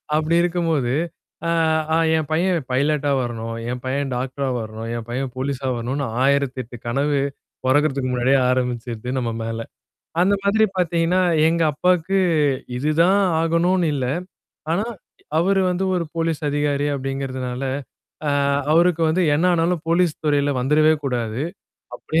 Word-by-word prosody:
அப்படி 155 +2 +1
இருக்கும்போது, 165 -7 0 0.5
ஆ, - - +1 0.5
"ஆ - - +4 0.2
என் 155 -2 -2
பையன் 175 +2 +2
பைலட்டா 145 +2 +1
வரணும், 115 -2 -4 0.2
என் 125 0 -5
பையன் 135 +1 -1
டாக்டரா 135 +2 -3
வரணும், 110 +1 -6
என் 115 -1 -7
பையன் 130 +2 -3
போலீஸா 135 0 -2
வரணும்ன்னு" 130 +5 -2 0.2
1008 135 -3 0
கனவு 140 +4 +1 0.5
பொறக்கிறதுக்கு 135 -1 +2
முன்னாடியே 125 +2 +3
ஆரம்பிச்சுருது 125 -2 -2
நம்ம 120 -2 -1
மேல. 115 0 -4 0.6
அந்த 190 +3 +4
மாதிரி 205 +2 +3
பார்த்தீங்கன்னா, 175 +1 +2 0.3
எங்க 165 0 +1
அப்பாவுக்கு 180 +4 +1 0.6
இதுதான் 160 +8 +3 0.2
ஆகணும்னு 170 +2 +2
இல்ல. 130 -3 -1 0.7
ஆனா, 195 +6 +1 0.5
அவர் 195 +4 +2
வந்து 180 +1 -1
ஒரு 175 -2 0
போலீஸ் 165 -2 -1
அதிகாரி 145 0 0
அப்படிங்கிறதுனால, 130 -2 -4 0.7
ஆ, - - +2 0.4
அவருக்கு 170 +1 +4
வந்து 175 +4 +1
என்ன 160 +4 +1
ஆனாலும் 170 0 +1
போலீஸ் 170 -1 +3
துறையில 145 -1 +2
வந்தறவே 150 +4 +4
கூடாது. 120 -2 -2 0.5
அப்படி 160 - -1
145 Hz, 130 wpm, -21 LUFS, 130-165 Hz, 0.7 s, ஆ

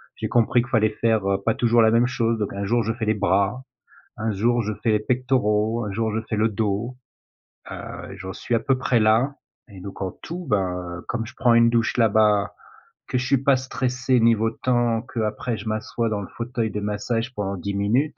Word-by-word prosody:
j'ai - - -4
compris 120 0 +3
qu'il 125 - -8
fallait 110 -2 +3
faire, 110 -3 +2
heu, 100 0 0
pas 115 - +3
toujours 120 -1 +3
la 110 0 +5
même 120 +2 +4
chose 115 -2 0
donc 105 - -2
un 100 0 -3
jour, 120 +3 +1
je 115 +1 -1
fais 115 -2 -4
les 110 - +2
bras. 100 +4 +1 0.5
Un 110 0 -1
jour, 120 +4 +1
je 110 +1 -2
fais 115 - +2
les 105 - +3
pectoraux. 115 -2 0
Un 100 - -4
jour 110 +2 -1
je 110 - 0
fais 110 - 0
le 110 +1 +2
dos. 110 +4 -2 0.7
Heu - - -8
et - - -11
j'en 95 0 -6
suis 120 - -2
à - - +2
peu 135 - +1
près 125 -2 +1
là 115 +6 +3 0.4
et 95 - -10
donc 100 0 -8
en 95 -1 -2
tout, 175 +1 -6
ben, 95 -3 +1 0.2
heu, - - -9
comme 115 -2 -2
je 110 - -11
prends 120 -2 +4
une 115 0 +6
douche 115 -1 +1
là-bas, 105 -2 +3 0.5
que 125 - -1
je 125 - -1
suis 135 +2 +3
pas 135 -2 +4
stressé 130 0 0
niveau 115 -1 +3
temps, 120 -2 0
qu'après 110 -1 -3
je 105 +2 -8
m'assois 110 +2 -2
dans 105 -1 -2
le 95 - -7
fauteuil 115 -2 -2
de 105 - -3
massage 115 +4 -2
pendant 100 -2 -3
10 100 +3 -4
minutes. 120 +10 +1
115 Hz, 225 wpm, -23 LUFS, 105-120 Hz, 0.7 s, une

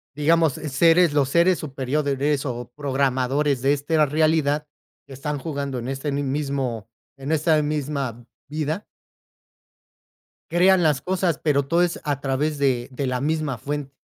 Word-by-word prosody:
Digamos 160 0 +3
seres 165 +4 +3
los 140 -3 +2
seres 170 +4 +3
superiores 140 0 -1
o 120 -2 -5
programadores 135 0 0
de 135 +2 +3
esta 150 +2 +2
realidad 155 0 +1 0.4
que 135 - -12
están 145 +2 -4
jugando 140 -2 -4
en 120 0 -5
este 135 +2 -3
mismo 135 -5 -2 0.3
en 135 +2 -5
esta 155 0 +3
misma 140 -5 -3 0.2
vida 155 +6 -3 1.6
crean 180 +1 +4
las 150 -4 +2
cosas, 180 -3 0
pero, 140 -3 +2
todo 170 +4 +2
es 175 -1 -1
a 145 -2 -1
través 145 +2 -1
de 130 -4 +1
de 135 +1 -3
la 125 -1 -1
misma 150 -3 -1
fuen 145 +2 -4
145 Hz, 140 wpm, -23 LUFS, 135-155 Hz, 1.6 s, crean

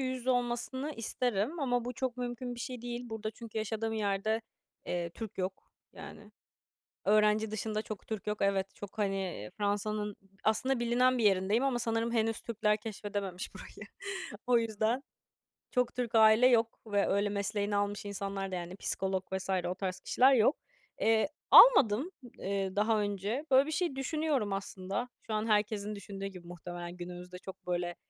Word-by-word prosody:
yüz 260 -1 -1
yüze 255 +1 -1
olmasını 245 +4 -1
isterim 240 - -1
ama 245 -3 +1
bu 250 - -3
çok 255 0 -3
mümkün 245 0 -4
bir 235 - -8
şey 250 -1 -5
değil. 240 0 -4
Burada 220 -1 -4
çünkü 225 -1 -7
yaşadığım 220 +1 -2
yerde, 215 +1 0 0.5
eee, 175 -1 -2
Türk 215 +1 -8
yok, 185 +1 -4 0.2
yani. - - -11 0.7
Öğrenci 210 +1 +4
dışında 215 0 -2
çok 215 -3 -7
Türk 220 -2 -5
yok, 210 0 -1
evet, 195 -1 +1
çok, 205 +1 -10
hani, 195 - -2
Fransa'nın 210 0 -1 0.3
aslında 240 +4 +2
bilinen 250 +2 +3
bir 225 - +1
yerindeyim 200 +5 +3
ama 255 -3 +1
sanırım 230 0 0
henüz 225 -1 +1
Türkler 215 -2 +1
keşfedememiş 205 -3 -5
burayı. - - -10 0.6
O 245 -1 +5
yüzden, 225 +3 0 0.7
çok 250 -1 +1
Türk 240 -2 -2
aile 220 +3 +7
yok 230 -2 +3
ve 205 -2 +1
öyle 200 +1 +2
mesleğini 205 0 -1
almış 205 0 -1
insanlar 195 -1 -3
da, - - -2
yani, 175 +1 -5
psikolog 190 -1 -2
vs. 190 0 -3 0.2
o 180 - -1
tarz 185 -1 -3
kişiler 265 +2 +4
yok. 245 +4 +4 0.4
Eee, 225 +3 +4 0.2
almadım, 285 - +8 0.3
eee, 195 -1 -2
daha 215 +1 +3
önce. 205 +7 -2
Böyle 265 +2 +7
bir - - -3
şey 335 -4 0
düşünüyorum 270 -6 0
aslında. 195 +4 -3 0.2
Şu 220 - -3
an 215 +1 0
herkesin 210 0 +1
düşündüğü 195 0 -7
gibi 180 -3 -10
muhtemelen, 175 0 -7
günümüzde 180 +1 -8
çok 190 -1 -11
böyle, 175 -1 -1
215 Hz, 160 wpm, -32 LUFS, 195-240 Hz, 0.7 s, almadım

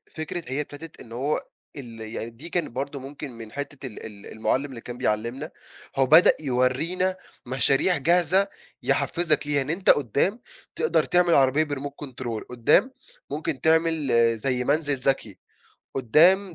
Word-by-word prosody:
فكرة 160 +2 -5
هي 135 +3 -2
ابتدت 150 +2 -10
إن 115 - -14
هو 135 +6 -1 0.4
ال 115 -5 -9
يعني 110 +1 -6
دي 125 +9 -11
كانت 175 -1 -1
برضو 140 +3 -5
ممكن 140 +1 -8
من 115 -2 -9
حتّة 145 +1 -6
ال 110 - -9
ال 105 -2 -10
المُعَلّم 125 +5 -1
اللي 130 -5 -9
كان 120 +1 -8
بيعلّمنا، 120 +5 -2 0.4
هو 135 - +3
بدأ 155 +7 +7
يوَرينا 155 +8 0 0.3
مشاريع 135 +7 +2
جاهزة 175 +6 +3 0.4
يحفّزك 155 -4 +1
ليها، 145 -1 +2
إن 135 - -5
أنت 180 +4 0
قدّام 145 - +3 0.4
تقدر 465 - +1
تعمل 175 -1 +3
عربية 135 +3 +4
بremote 145 -1 -5
control، 120 -4 -6
قدّام 125 - +3 0.4
ممكن 150 -2 -3
تعمل 160 -2 +3 0.3
زي 125 +2 -1
منزل 145 +1 +1
ذكي، 130 -6 -1 0.6
قدّام 170 - +4
140 Hz, 150 wpm, -24 LUFS, 125-160 Hz, 0.6 s, بدأ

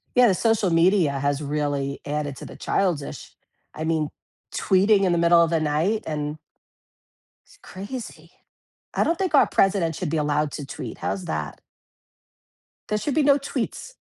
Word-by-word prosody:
Yeah, 250 -1 +7
the 195 - +4
social 220 -4 +2
media 170 -1 +4
has 145 +1 0
really 145 -1 -2
added 145 -1 -3
to - - -9
the - - -10
childish, 175 -7 -2 0.4
I 155 - -5
mean, 160 -2 0 0.5
tweeting 195 +1 +3
in 185 - +3
the 170 - +2
middle 170 0 +5
of 165 - +1
the 165 -1 +1
night 155 +8 0
and 150 0 -3 1.1
it's - - -21
crazy. 215 +6 -8 0.6
I - - +2
don't 335 0 0
think 375 -5 -1
our 280 - +7
president 190 -5 +2
should 165 -2 -3
be 165 - 0
allowed 150 -1 0
to 145 - -6
tweet. - - -7
How's 185 - -3
that? - - -4 1.3
There 210 - 0
should 275 +6 -2
be 310 - +3
no 285 0 +5
tweets. 280 - -4
170 Hz, 165 wpm, -24 LUFS, 150-210 Hz, 1.3 s, Yeah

